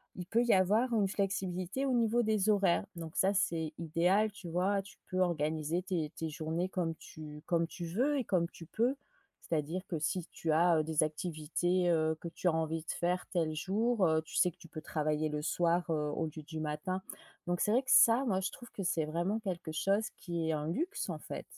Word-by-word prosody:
il 180 - -6
peut 230 +6 +2
y 240 - +4
avoir 210 +7 +3
une 210 -3 +3
flexibilité 190 +3 -1
au 265 - +1
niveau 235 0 +3
des 215 -1 +2
horaires. 200 -3 +3
Donc 165 0 -7
ça 195 +2 +3
c'est 165 -5 0
idéal 180 +6 +2
tu 200 -3 -10
vois, 190 +4 +1
tu 195 0 -15
peux 185 - -1
organiser 160 -1 0
tes 165 -5 -2
tes 160 - -3
journées 160 +4 -2
comme 170 -4 -1
tu 150 -1 -10
comme 170 -1 +1
tu 175 0 -6
veux 255 - +1
et 260 - 0
comme 175 -4 +1
tu 165 - -11
peux. 240 - +1 0.5
C'est-à-dire 160 +3 -2
que, 170 - -2
si 160 +3 -1
tu 160 - -2
as, 170 +1 +4
heu, 155 - +2
des 155 -1 +1
activités, 175 +3 0
heu, 160 -1 +2
que 170 - -5
tu 170 - -3
as 175 - +4
envie 160 0 -1
de - - -3
faire 180 +1 -1
tel 160 -4 0
jour, 205 +5 +1
heu, 160 -1 +3
tu 160 - -11
sais 180 - +4
que - - -30
tu 170 -2 -14
peux 155 -1 -8
travailler 155 0 0
le 150 0 -2
soir, 170 +2 +1
heu, 150 -2 0
au 160 - -1
lieu 155 0 -8
du 160 +1 -6
matin. 155 +5 -2 0.5
Donc 175 0 0
c'est 210 - +2
vrai 250 +4 +4
que 255 - -9
ça, 235 +4 +7
moi 190 -6 +1
je 190 - -1
trouve 240 - -11
que 195 - -5
c'est 170 -3 +1
vraiment 175 +8 -1
quelque 180 -6 -4
chose 200 +7 +1
qui 170 -3 -3
est - - +3
un 150 0 -2
luxe 335 - -2
en - - -3
fait. - - -7
175 Hz, 225 wpm, -33 LUFS, 160-195 Hz, 0.5 s, ça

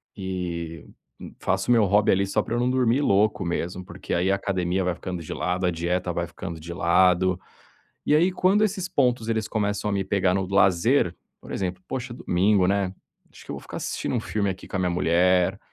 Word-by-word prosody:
E 85 -4 -5 0.5
faço 95 +3 -1
o - - +5
meu 115 -3 +5
hobby 100 +2 +3
ali 95 +1 +2
só 105 - +1
pra 115 - -5
eu - - 0
não 125 - +1
dormir 130 +1 +2
louco 105 -4 +2
mesmo. 90 +2 -3
Porque 90 +1 -6
aí 90 +3 +2
a - - +3
academia 95 -1 -1
vai 90 -1 0
ficando 90 -1 -5
de 75 - -6
lado, 90 +1 -1
a 90 - +2
dieta 90 +2 -1
vai 85 0 -2
ficando 85 -1 -7
de 85 +2 -7
lado. 90 +1 +3 0.7
E 150 - +4
aí, 175 +4 +3
quando 195 +4 +3
esses 190 -3 -2
pontos 125 -4 +1
eles 110 -2 0
começam 105 -1 -1
a - - -1
me 100 -1 0
pegar 95 -1 +1
no 95 -1 0
lazer, 95 +2 +3 0.3
por - - -10
exemplo: 90 -1 -3
"Poxa, 125 -2 -4
domingo, 95 -1 +2
né, 95 -1 0 0.4
acho - - -15
que - - -10
eu - - -3
vou - - -7
ficar - - -9
assistindo - - -3
um - - +1
filme 100 -2 -1
aqui 95 - -7
com - - -4
a - - -1
minha 90 -1 +1
mulher. 90 +2 +2
95 Hz, 215 wpm, -25 LUFS, 90-105 Hz, 0.7 s, o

